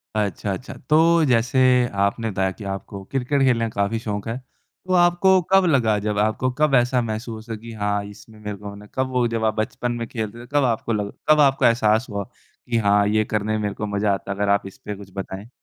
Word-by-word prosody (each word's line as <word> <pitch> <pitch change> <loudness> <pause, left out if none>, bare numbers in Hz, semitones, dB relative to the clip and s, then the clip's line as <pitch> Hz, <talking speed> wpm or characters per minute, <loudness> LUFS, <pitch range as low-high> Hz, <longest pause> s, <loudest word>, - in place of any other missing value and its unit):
अच्छा, 100 -1 -1
अच्छा। 130 +7 -7 0.2
तो 165 +2 +5
जैसे 125 0 +2 0.4
आपने 110 +2 -1
बताया 95 0 0
कि 105 - -11
आपको 100 0 -8
क्रिकेट 135 +5 -1
खेलने 115 -2 +2
का 100 -2 -2
काफ़ी 110 +3 0
शौक 105 -2 -4
है, 115 +2 -3 0.5
तो 185 - 0
आपको 180 +1 +4
कब 195 -1 +6
लगा, 120 -9 +3
जब 105 0 -2
आपको 110 +4 +1
कब 150 -3 +4
ऐसा 125 0 +3
महसूस 110 0 -5
हुआ 115 - -3
कि, 115 +1 -10
"हाँ, 105 -1 -1
इसमें 105 +2 -13
मेरे 105 -1 -6
को 105 +1 -10
होना 100 +1 -11
है।" - - -21
कब 130 0 0
वो 125 -2 +2
जब 115 -1 -1
आप 110 - +2
बचपन 115 +2 -2
में 120 -1 -4
खेलते 110 0 -5
थे, 120 - -12
कब 145 - +3
आपको 115 -2 0
लग 105 -1 -2 0.2
कब 155 - +6
आपका 135 -3 +4
एहसास 110 0 +2
हुआ 100 -1 -3
कि, 115 +5 -7
"हाँ, 100 -2 +3
ये 110 +1 +2
करने 110 0 -1
में 110 - 0
मेरे 105 -1 -1
को 105 - -4
मज़ा 100 0 +2
आता 100 0 -4
है"? 100 - -4
अगर 100 0 0
आप 100 -1 +2
इस 95 - -12
पे 105 - -4
कुछ 95 -1 -12
बताएँ। 95 +2 -6
110 Hz, 240 wpm, -22 LUFS, 105-125 Hz, 0.5 s, कब